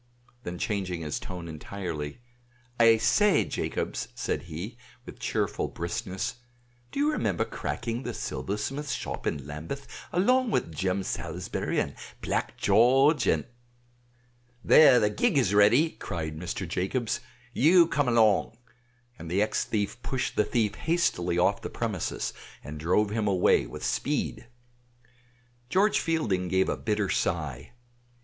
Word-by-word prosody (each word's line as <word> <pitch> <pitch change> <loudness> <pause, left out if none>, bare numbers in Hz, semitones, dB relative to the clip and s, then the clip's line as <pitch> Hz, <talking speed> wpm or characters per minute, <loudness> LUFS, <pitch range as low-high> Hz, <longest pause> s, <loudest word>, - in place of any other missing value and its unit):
Then 90 -6 -6
changing 95 -4 -2
his 75 -2 -3
tone 90 -2 -7
entirely, 80 +1 -6 0.6
"I 115 -1 +7
say, 205 - +3
Jacobs," - - -3
said - - -2
he, 90 +9 -6 0.3
with 120 - -11
cheerful 110 -4 -1
briskness, 95 +4 -4 0.5
"do - - -4
you 295 +2 +3
remember - - 0
cracking 120 0 -4
the - - -5
silversmith's 105 - -3
shop - - -4
in 70 -2 -2
Lambeth 80 - -6 0.3
along 250 +8 +3
with 85 - -1
Jem 95 +3 0
Salisbury 90 0 -3
and - - -1 0.3
Black - - -2
George, 130 +9 +4
and - - +2 0.6
" 120 0 -36
"There, 130 -5 +8
the 105 -2 +2
gig 215 - +1
is 115 -8 +2
ready," 115 +11 +5
cried 80 -4 -5
Mr. 90 +3 -4
Jacobs; 95 +8 -1 0.3
"you 170 +7 +6
come 145 -4 0
along," 110 -2 +3 0.6
and 85 - -7
the 90 +3 +1
ex 110 - -1
thief 110 +2 -2
pushed 130 0 -2
the - - +3
thief 105 -2 0
hastily 105 - 0
off 90 - +2
the - - -5
premises - - -3 0.3
and 75 +1 -7
drove 95 +6 +2
him 110 -1 0
away 95 -10 +3
with - - -8
speed. - - -2 1.2
George 200 +7 +3
Fielding 110 - 0
gave 95 +1 +2
a - - 0
bitter 105 -2 -1
sigh. 75 - -2
105 Hz, 140 wpm, -28 LUFS, 90-125 Hz, 1.2 s, There